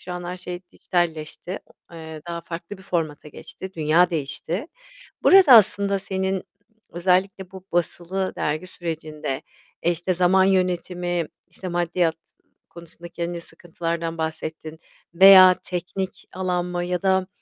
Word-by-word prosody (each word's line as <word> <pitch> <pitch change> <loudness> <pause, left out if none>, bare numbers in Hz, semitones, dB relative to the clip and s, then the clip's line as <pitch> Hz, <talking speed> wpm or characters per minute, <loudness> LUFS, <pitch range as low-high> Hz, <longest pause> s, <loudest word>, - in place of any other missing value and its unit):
şu 180 - -7
an 180 0 -6
her 180 +1 -5
şey 180 -1 -7
dijitalleşti. 175 +1 -2 0.3
Eee, 160 -2 -9
daha 170 0 -4
farklı 170 +4 -8
bir - - -14
formata 155 -5 -3
geçti. 190 +5 -9
Dünya 165 +3 +3
değişti. 165 - -3 0.6
Burada 370 -9 +8
aslında 200 -2 +5
senin, 190 0 -2 0.5
özellikle 185 +2 0
bu 190 -1 -11
basılı 175 +2 -1
dergi 155 +5 -2
sürecinde, 155 -6 -5 0.4
işte, 175 +2 0
zaman 185 +2 +4
yönetimi, 180 -2 0 0.2
işte, 185 - -9
maddiyat 175 -1 0 0.5
konusunda 170 0 -12
kendi 170 0 -4
sıkıntılardan 165 0 -5
bahsettin 160 0 -5 0.4
veya 185 +1 +9
teknik 185 +1 -5
alan 180 -1 -1
mı 175 0 -3
ya 180 +1 -2
da 190 -1 +2
175 Hz, 125 wpm, -23 LUFS, 165-185 Hz, 0.6 s, veya